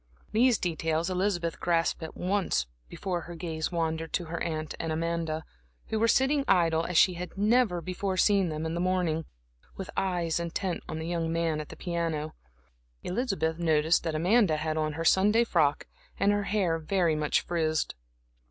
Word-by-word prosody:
These 240 +1 +4
details 165 0 -1
Elizabeth 180 -3 -1
grasped 170 -1 +1
at 160 - -7
once 190 - 0 0.2
before 180 - -3
her 170 +1 -9
gaze 160 -1 -3
wandered 160 -1 -2
to 175 - 0
her 165 +1 -5
aunt 155 -2 -3
and 165 - -2
Amanda, 160 -1 -2 0.4
who 220 - 0
were 230 - +3
sitting 270 +4 +3
idle 165 -3 +3
as 180 - 0
she 185 - +6
had 180 +2 -7
never 210 -3 +3
before 185 +2 -3
seen 195 -2 +3
them 155 0 -3
in 160 - -2
the 170 - -2
morning, 180 -3 0 0.5
with 195 - -6
eyes 175 -3 0
intent 170 +2 -2
on 160 - -3
the 160 - -4
young 165 -1 -1
man 165 -2 0
at 150 - -10
the - - -9
piano. 165 -3 -2 0.7
Elizabeth 180 - -1
noticed 160 -1 +3
that 165 -2 -2
Amanda 180 0 +3
had 155 0 -2
on 155 -1 -1
her 165 +2 -4
Sunday 210 +7 +4
frock 155 -10 +1 0.3
and 200 - +4
her 205 -1 0
hair 185 -6 +1
very 170 0 +1
much 150 -1 +1
frizzed. 160 -2 -1
170 Hz, 175 wpm, -28 LUFS, 160-190 Hz, 0.7 s, she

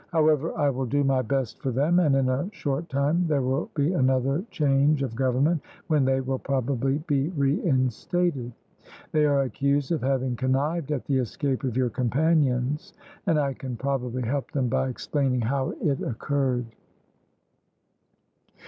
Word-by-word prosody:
However, 155 -1 +2
I 145 -1 +2
will 130 0 -3
do 145 +4 +1
my 135 -1 +2
best 130 0 -2
for 135 - -1
them, 145 +8 +2
and 150 -6 +3
in 135 -1 +2
a 130 +8 -1
short 145 +3 -3
time 150 +6 +1
there 145 -4 +1
will 130 +4 -1
be 150 +3 +1
another 135 +2 +1
change 140 0 +2
of 130 -4 -3
government, 135 +6 +1 0.3
when 150 -4 +3
they 135 0 +2
will 130 0 -2
probably 135 0 0
be 140 +1 +1
reinstated. 140 - 0 0.6
They 155 -1 +3
are 140 -1 +3
accused 140 +2 0
of 165 - 0
having 130 -1 0
connived 140 +5 0
at 140 -4 -2
the 135 -2 +1
escape 130 +2 -2
of 125 -2 -2
your 125 -2 +1
companions, 140 +1 +1 0.3
and 165 -4 +3
I 140 -2 +1
can 130 -2 -6
probably 130 -1 -2
help 135 +4 -2
them 135 -4 0
by 130 +1 0
explaining 130 0 -1
how 130 +4 -1
it 140 -4 0
occurred." 130 0 -1
135 Hz, 155 wpm, -26 LUFS, 130-145 Hz, 0.6 s, and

